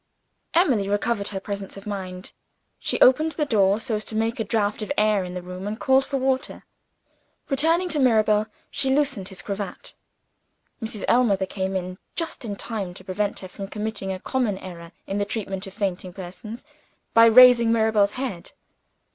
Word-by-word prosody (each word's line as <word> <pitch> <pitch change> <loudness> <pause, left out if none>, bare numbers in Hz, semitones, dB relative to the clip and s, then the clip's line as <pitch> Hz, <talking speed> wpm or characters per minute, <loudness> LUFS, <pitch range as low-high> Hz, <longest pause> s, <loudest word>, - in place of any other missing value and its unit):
Emily 255 - +3
recovered 205 0 0
her 195 - -4
presence 200 0 -6
of 195 - -11
mind. 185 -3 -6 0.5
She - - -1
opened 310 +5 +5
the 300 - -1
door, 205 -5 +3
so 225 +1 -2
as 210 - -4
to 220 - -4
make 225 +2 0
a - - +1
draught 210 0 -1
of 215 - -4
air 210 -2 +3
in 180 0 -7
the 180 - -5
room, 180 +2 -7
and 215 +2 -4
called 265 0 +3
for 275 - -2
water. 265 0 -1 0.9
Returning 325 +6 +3
to 310 - 0
Mirabel, 215 -4 +3 0.2
she 270 - +1
loosened 270 -10 +1
his 190 -2 -7
cravat. 200 -2 -5 0.9
Mrs. 220 -2 -4
Ellmother 210 -6 +3
came 190 0 -3
in, 185 0 -4 0.2
just 330 -5 -3
in 210 -3 -4
time 200 -4 -5
to 185 - -11
prevent 200 +2 -2
her 185 - -7
from 195 +1 -8
committing 210 -2 -4
a 185 - -4
common 235 -3 -1
error 170 -3 -10
in 195 +1 -3
the - - +2
treatment 195 -2 -4
of 195 - -11
fainting 185 -3 -3
persons, 200 +6 -8 0.5
by 230 0 +8
raising 235 0 +8
Mirabel's 220 -3 +3
head. 250 -10 -5
210 Hz, 180 wpm, -24 LUFS, 195-235 Hz, 0.9 s, by